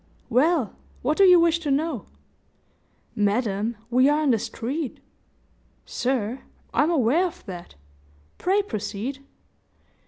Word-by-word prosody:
"Well, 270 - +2 0.3
what 295 +5 +1
do 395 - +8
you 360 -2 +8
wish 335 0 +3
to 310 -3 -4
know?" 280 -3 -1 1.1
"Madam, 210 +1 0
we 255 +3 +5
are 300 +1 +2
in 285 - +3
the 225 - +2
street." 265 +7 -4 0.9
"Sir, 250 -1 -1 0.3
I'm 300 - +3
aware 320 +3 +3
of 345 - -12
that. 175 - -9 0.6
Pray 395 +3 +2
proceed." 235 - -5
265 Hz, 120 wpm, -24 LUFS, 225-320 Hz, 1.1 s, do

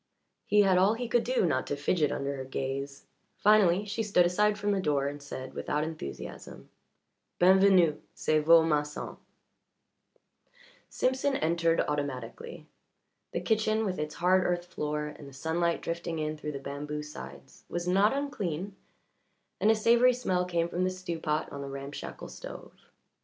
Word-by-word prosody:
He 210 - +5
had 190 -2 +4
all 200 +4 +4
he 245 +1 -4
could 240 0 +2
do 250 -5 +1
not 130 -6 0
to 145 - -1
fidget 150 +1 +1
under 140 0 -2
her 135 - -5
gaze; 135 +1 -4 0.3
finally, 205 -2 +4
she 205 +2 -3
stood 200 -5 +3
aside 210 +4 +2
from 205 0 0
the 200 - +1
door 145 -4 +1
and 145 0 -6
said, 130 -2 -7
without 150 +1 -1
enthusiasm: 155 - -7 0.7
"B'en 185 +2 +6
venu. 185 -6 +4
C'est 155 0 +1
vo' 165 +1 +7
masson." 150 -2 -2 1.7
Simpson 265 +2 0
entered 165 0 +2
automatically. 145 +2 -4 0.7
The - - -2
kitchen, 220 0 +1
with 185 -4 -2
its 150 0 -4
hard 185 +2 +3
earth 175 0 -1
floor 150 -3 -3
and 150 -1 -9
the - - -16
sunlight 165 +4 -1
drifting 170 0 -3
in 155 0 -2
through 150 0 -6
the - - -4
bamboo 145 +2 -5
sides, 70 - -11
was 175 0 -3
not 195 +4 +4
unclean, 200 - -3 0.8
and 215 - +3
a 220 - +6
savoury 235 +3 +5
smell 185 -7 0
came 170 -2 0
from 175 +1 -2
the 185 - +2
stew 185 -3 -5
pot 155 -1 -1
on 140 - -6
the 140 - -6
ramshackle 140 +1 -7
stove. - - -9
170 Hz, 165 wpm, -29 LUFS, 150-195 Hz, 1.7 s, vo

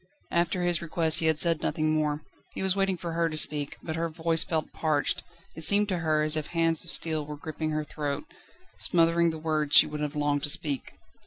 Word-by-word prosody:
After 175 +1 0
his 175 -2 +1
request 165 -1 +1
he 160 - 0
had 160 -1 +2
said 165 -1 +4
nothing 155 -2 0
more. 150 -1 -1 0.3
He - - -3
was 190 -1 +2
waiting 195 -2 0
for 170 -1 -5
her 165 0 0
to 155 - -2
speak; 145 -2 0
but 160 - -4
her 165 0 -2
voice 165 0 +2
felt 160 -2 -3
parched; 155 -3 -1 0.3
it 160 - -7
seemed 205 +4 +4
to 185 -3 -1
her 155 -2 +1
as 155 0 +1
if 155 -1 -3
hands 165 -2 0
of 170 - -4
steel 160 -3 +3
were 150 0 -8
gripping 155 +1 -5
her 155 0 -2
throat, 145 - -4 0.6
smothering 170 0 +2
the 160 - -5
words 155 -2 -1
she - - +9
would 150 0 -6
have 150 0 -3
longed 145 -1 0
to 145 - 0
speak. 145 -2 -1
160 Hz, 225 wpm, -27 LUFS, 150-170 Hz, 0.6 s, she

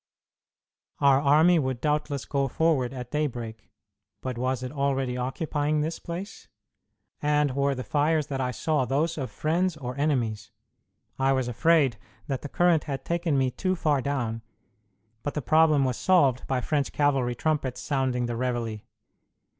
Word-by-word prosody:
Our 140 -1 +5
army 155 +5 +5
would 130 -4 -2
doubtless 150 0 -1
go 140 -1 0
forward 140 -4 +1
at 125 -2 -7
daybreak, 120 -7 -3 0.5
but 130 -1 -3
was 130 +1 -1
it 125 - -4
already 135 -3 -1
occupying 145 +4 -1
this 160 +2 -3
place? 180 +4 -7 0.7
And 150 -1 +2
were 140 0 +1
the 130 - -4
fires 150 +2 +1
that 135 -2 -3
I 125 - 0
saw 150 +3 0
those 150 +7 0
of 130 -3 -3
friends 165 - 0
or 125 -3 -5
enemies? 120 -9 0 0.7
I 135 0 +3
was 130 -2 0
afraid 135 0 +3 0.3
that 135 0 -3
the 145 - -7
current 175 -1 +2
had 135 -3 -5
taken 170 -4 0
me 130 -1 +2
too 185 +7 -1
far 150 -5 +1
down, 120 -5 -2 0.8
but 145 - -4
the 150 - -1
problem 155 -2 +4
was 125 -2 -1
solved 140 -9 +3
by 130 -2 0
French 145 +1 -1
cavalry 135 -4 +1
trumpets 140 -2 -1
sounding 130 -3 -1
the 120 - -3
reveillé. 115 -3 -2
140 Hz, 155 wpm, -26 LUFS, 125-155 Hz, 0.8 s, Our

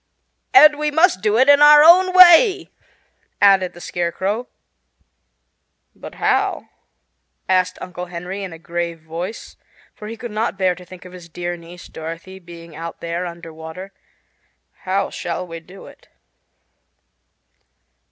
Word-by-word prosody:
"And 305 -6 +6
we 300 0 -1
must 320 - +2
do 215 +1 +1
it 260 +3 +3
in 285 0 +5
our 295 0 +8
own 365 +3 +6
way," 370 +3 +6 0.7
added 195 -2 +3
the 175 - -14
Scarecrow. 190 +7 -4 1.5
"But - - -12
how?" - - -1 0.8
asked 185 -1 0
Uncle 180 0 -8
Henry 180 +3 -7
in 190 - -7
a 165 - -10
grave 170 0 -5
voice, 170 +7 -8 0.4
for 210 - -11
he 225 +1 -8
could 240 -1 -8
not 215 -3 -3
bear 185 -2 +1
to 180 +1 -14
think 185 0 -14
of 180 - -13
his 175 -2 -13
dear 175 +1 -5
niece 170 +1 -14
Dorothy 165 +4 -9
being 170 -2 -14
out 165 +1 -8
there 170 +2 -4
under 170 -1 -11
water; 160 +5 -10 1.0
"how 195 +1 -1
shall 175 +1 -5
we 165 -1 -9
do 180 +4 -15
it?" - - -17
185 Hz, 140 wpm, -19 LUFS, 170-220 Hz, 1.5 s, our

